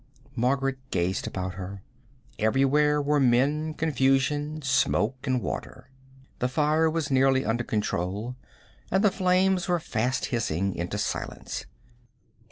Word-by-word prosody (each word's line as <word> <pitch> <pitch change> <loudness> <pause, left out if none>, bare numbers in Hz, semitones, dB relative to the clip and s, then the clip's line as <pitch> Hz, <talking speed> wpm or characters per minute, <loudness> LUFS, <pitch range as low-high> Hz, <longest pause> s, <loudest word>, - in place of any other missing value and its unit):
Margaret 135 +2 0
gazed 90 -2 -1
about 95 -1 -4
her. 95 +1 -7 0.6
Everywhere 135 +6 +3
were 145 0 +2
men, 140 +5 +2
confusion, 145 +1 +1
smoke 130 -1 +1
and 130 -1 +1
water. 130 +1 -6 0.5
The 125 - +1
fire 155 +4 +2
was 160 -2 -2
clearly 135 0 +3
under 120 +2 0
control, 105 +2 -2 0.5
and 190 +3 +2
the 210 - +5
flames 185 0 +2
were 175 -1 +2
fast 130 -4 -1
hissing 100 -4 0
into 85 +1 -3
silence. - - -4
135 Hz, 120 wpm, -27 LUFS, 115-150 Hz, 0.6 s, the